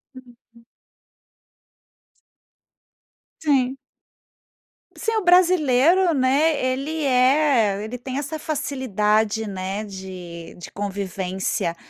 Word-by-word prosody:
Uhum. 235 -2 -18 2.8
Sim. 270 -4 +1 1.2
Se 450 -1 -2
o 430 - -1
brasileiro, 350 -1 +4
né, 280 +3 +2
ele 275 +5 -2
é 255 -6 +3
ele 225 +3 -6
tem 260 +2 -5
essa 295 +2 -4
facilidade, 220 -8 0
né, 195 +1 -4
de 185 -4 -9
de 175 - -10
convivência. 190 -3 -3
255 Hz, 80 wpm, -22 LUFS, 200-295 Hz, 2.8 s, brasileiro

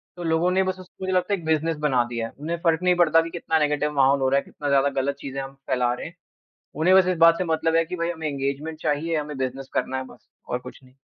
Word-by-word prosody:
तो 175 - -7
लोगों 165 +2 +1
ने 190 +1 +3
बस 185 0 -3
उसको 185 +1 -12
मुझे 185 0 -1
लगता 185 +3 +1
है 195 - 0
एक 160 - -12
बिज़नेस 160 0 +1
बना 135 -5 +2
दिया 115 -1 -3
है - - -14
उन्हें 165 +3 -3
फ़र्क 165 0 +2
नहीं 180 -1 +4
पड़ता 165 -2 +4
कि 165 - -5
कितना 160 -1 -1
नेगेटिव 150 0 +1
माहौल 135 +1 +4
हो 130 - +2
रहा 140 - +3
है, - - -7
कितना 145 - -5
ज़्यादा 140 0 +3
गलत 140 +1 -1
चीज़ें 135 -1 -5
हम 135 0 -8
फैला 125 -2 +1
रहे - - -6
हैं। 170 - -13 0.6
उन्हें 175 +5 +4
बस 190 - +6
इस 180 -2 0
बात 165 0 +7
से 185 - 0
मतलब 160 -1 0
है 165 0 +3
कि 180 +2 -5
भाई 170 0 -2
हमें 160 -2 -5
एंगेजमेंट 140 +3 -3
चाहिए, 155 +2 0
हमें 150 -2 -4
बिज़नेस 130 +1 -4
करना 130 - -1
है 130 - -3
बस 120 -3 -17 0.2
और 125 - -1
कुछ 125 - -11
नहीं। 130 +1 -21
155 Hz, 280 wpm, -24 LUFS, 135-170 Hz, 0.6 s, बात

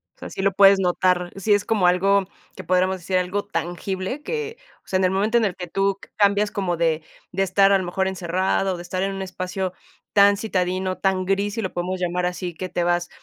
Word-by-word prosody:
o - - -46
sea, - - -8
sí - - -5
lo 195 0 +2
puedes 195 0 +6
notar, 180 -1 +1
sí 195 +2 +1
es 205 - +1
como 210 -5 +1
algo 195 +2 +3 0.3
que 185 - -8
podríamos 185 +2 +1
decir 185 +1 -1
algo 185 +3 -1
tangible 190 - -4
que, 455 +2 -4 0.3
o - - -36
sea, 190 - +1
en 190 - +1
el 185 - +3
momento 210 +5 +2
en 230 - +3
el 190 -4 -2
que 180 - -6
tú 195 +2 0 0.2
cambias 205 0 +3
como 180 -4 -1
de 165 -1 +1 0.3
de 195 +2 +1
estar 195 +1 +4
a - - +6
lo 190 - -3
mejor 190 +2 -1
encerrada, 190 +1 0
de 175 - -7
estar 185 +2 -3
en 195 0 -1
un 195 - -5
espacio 185 0 -4 0.4
tan 200 0 +6
citadino, 185 -2 -1
tan 190 -1 +1
gris, 200 +2 0
si 225 - -2
lo 190 - -3
podemos 180 +1 -2
llamar 180 0 -1
así, 180 0 -3
que 185 +3 -5
te 175 - -2
vas 175 0 0
190 Hz, 230 wpm, -23 LUFS, 180-200 Hz, 0.4 s, puedes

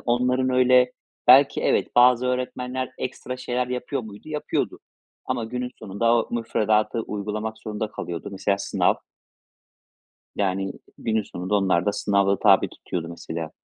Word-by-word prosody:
onların 125 +2 +1
öyle 125 0 +4 0.3
belki, 135 +3 +7
evet, - - +2
bazı 125 0 +6
öğretmenler 125 0 -2
ekstra 125 0 -5
şeyler 125 0 -2
yapıyor 125 +1 -3
muydu? 110 +6 -11
Yapıyordu 150 -1 -2 0.5
ama 125 -3 -1
günün 125 +2 -4
sonunda 110 +4 +1
o 115 - 0
müfredatı 110 -1 +1
uygulamak 105 +1 -4
zorunda 110 0 -4
kalıyordu. 85 -5 -5
Mesela, 100 +1 0
sınav - - +1 1.4
yani 95 -1 0 0.3
günün 110 -1 0
sonunda 95 +2 -3
onlar 95 -4 +2
da 105 - +2
sınava 100 -1 +1
tabi - - +5
tutuyordu 85 -2 -5
mesela. 80 -1 -6
115 Hz, 130 wpm, -24 LUFS, 100-125 Hz, 1.4 s, belki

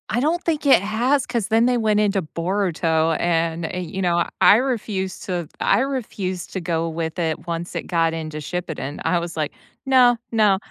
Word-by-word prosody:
I 235 - 0
don't 320 +7 0
think 310 -3 -1
it 275 -9 +6
has, 245 +7 +1
'cause 235 -5 -2
then 225 +1 +3
they 250 -1 +2
went 215 -2 +2
into 200 -2 +1
Boruto, 165 -2 0
and, 165 -1 0
eh, 180 - -4
you 180 +2 -5
know, 175 -2 +2 0.2
I - - +8
refused 215 -7 -2
to 175 -4 -3
I 200 - +3
refused 215 -9 -3
to 190 - -2
go 165 -1 -1
with 160 +1 -4
it 160 -1 -2
once 170 0 -4
it - - -4
got 165 -2 +1
into 155 -1 -5
Shippuden, 155 -2 -5
I 175 - +2
was 170 -1 -6
like, 155 -2 -2 0.3
"No, 250 -2 +5
no." 210 -4 +4
185 Hz, 190 wpm, -22 LUFS, 165-225 Hz, 0.3 s, I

